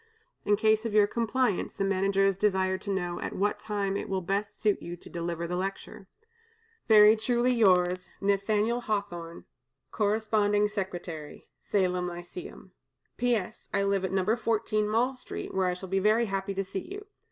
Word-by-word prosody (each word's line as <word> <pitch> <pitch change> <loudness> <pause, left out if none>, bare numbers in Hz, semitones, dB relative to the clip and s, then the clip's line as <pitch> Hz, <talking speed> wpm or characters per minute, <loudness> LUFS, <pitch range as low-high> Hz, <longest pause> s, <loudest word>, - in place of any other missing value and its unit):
In 205 - +4
case 220 +1 +2
of 225 -2 -3
your 210 -1 +7
compliance, 235 0 -1
the - - -1
Managers 195 0 +2
desire 190 -1 +1
to 200 - -8
know 175 -3 -2
at - - -4
what 205 +2 0
time 200 -2 -2
it - - -4
will 190 -1 -1
best 200 +3 -2
suit 210 -2 +1
you 175 +1 -6
to - - -14
deliver 170 0 -3
the 175 +1 -3
lecture. 195 +1 -5 0.8
"Very 215 -1 +8
truly 240 +2 +1
yours, 180 -5 +3
"NATH^L 210 +4 +1
HAWTHORNE, 175 -7 -4 0.5
"Cor. 210 -1 +1
Sec'y, 205 -7 -1 0.2
Salem 180 -3 0
Lyceum. 175 +1 -9 0.5
"P.S. 230 -4 -1
I 200 -1 +1
live 200 -1 +1
at 190 - -2
No. 190 +3 +2
14 215 -2 0
Mall 245 +5 +1
Street, 250 - -7
where 190 -1 +1
I 180 - 0
shall 190 +1 -8
be 195 +1 0
very 215 +4 +3
happy 195 -1 -3
to 195 - -1
see 190 0 -6
you. 410 +1 -7
200 Hz, 165 wpm, -28 LUFS, 185-215 Hz, 0.8 s, Very